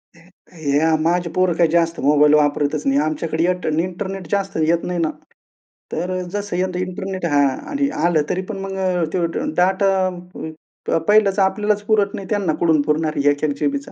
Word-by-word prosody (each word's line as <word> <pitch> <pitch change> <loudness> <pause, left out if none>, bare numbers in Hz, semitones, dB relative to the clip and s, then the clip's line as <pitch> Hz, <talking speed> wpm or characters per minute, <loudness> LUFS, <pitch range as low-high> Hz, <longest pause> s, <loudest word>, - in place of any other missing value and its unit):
हे 165 -4 -5
या 160 +1 +3
माझे 170 +2 +1
पोरं 185 -1 +2
काय 170 - +4
जास्त 165 +1 +1
मोबाईल 150 +1 +4
वापरतच 145 0 +1
नाही. 135 +1 +3
आमच्याकडे 160 +1 -1
येट 180 +1 0
इंटरनेट 180 +3 -3
जास्त 195 -3 -1
येत 170 +1 +2
नाही 180 -1 -2
ना. 160 -2 +1 0.8
तर 180 +3 -2 0.2
जसं 205 -2 -3
येतं 180 0 -1
इंटरनेट 185 0 -4
हां 145 -3 +3 0.3
आणि 280 -1 0 0.2
आलं 170 -3 +3
तरी 185 - -1
पण 215 - -4
मग 195 0 -5 0.3
त्यो 175 -2 0
ड - - 0 0.2
डाटा 190 +2 +3 1.0
अ, - - +3
पहिलंच 210 -2 +4
आपल्यालाच 205 +2 +1
पुरत 205 -2 +2
नाही 195 - -7
त्यांना 200 -6 0
कुठुन 160 -3 +3
पुरणार 155 +1 0
आहे 145 0 +3
1-1 145 +1 0
जीबीचा? 285 0 -2
175 Hz, 175 wpm, -20 LUFS, 155-195 Hz, 1.0 s, काय